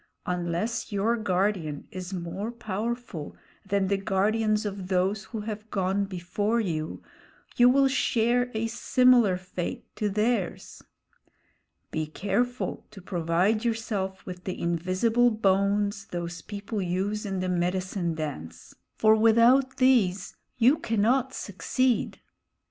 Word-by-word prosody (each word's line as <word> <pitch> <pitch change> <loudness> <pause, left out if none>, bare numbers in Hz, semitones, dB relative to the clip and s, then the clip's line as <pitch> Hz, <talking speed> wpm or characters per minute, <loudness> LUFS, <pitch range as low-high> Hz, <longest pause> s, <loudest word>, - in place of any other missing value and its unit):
Unless 180 +7 -2
your 205 +3 +1
guardian 185 -7 -1
is 185 0 -6
more 190 +4 -4
powerful 230 -6 -4 0.3
than 200 -1 0
the 200 +1 +1
guardians 215 +3 +1
of 195 -2 -4
those 190 +2 0
who 225 -3 -6
have 215 0 -6
gone 195 0 0
before 195 +4 -1
you, 160 -7 -3 0.5
you 245 0 +6
will 270 +1 +5
share 245 -2 +1
a 220 +1 0
similar 240 -3 +4
fate 185 -1 -5
to 210 - 0
theirs. 210 -1 -1 1.1
Be 155 -1 -2
careful 205 +10 -2
to 215 - -12
provide 180 +4 0
yourself 215 -5 -2
with 180 -1 -8
the 185 - -4
invisible 185 +8 +2
bones 200 -1 +1
those 175 -1 -5
people 205 +2 -5
use 190 +4 -1
in 195 -2 -3
the 185 - -1
medicine 180 -1 -1
dance, 145 - -6 0.2
for 220 0 +5
without 235 +4 +4
these 210 -8 +2 0.2
you 250 +5 +5
cannot 235 +4 +1
succeed." 245 +5 -1
200 Hz, 120 wpm, -27 LUFS, 185-225 Hz, 1.1 s, you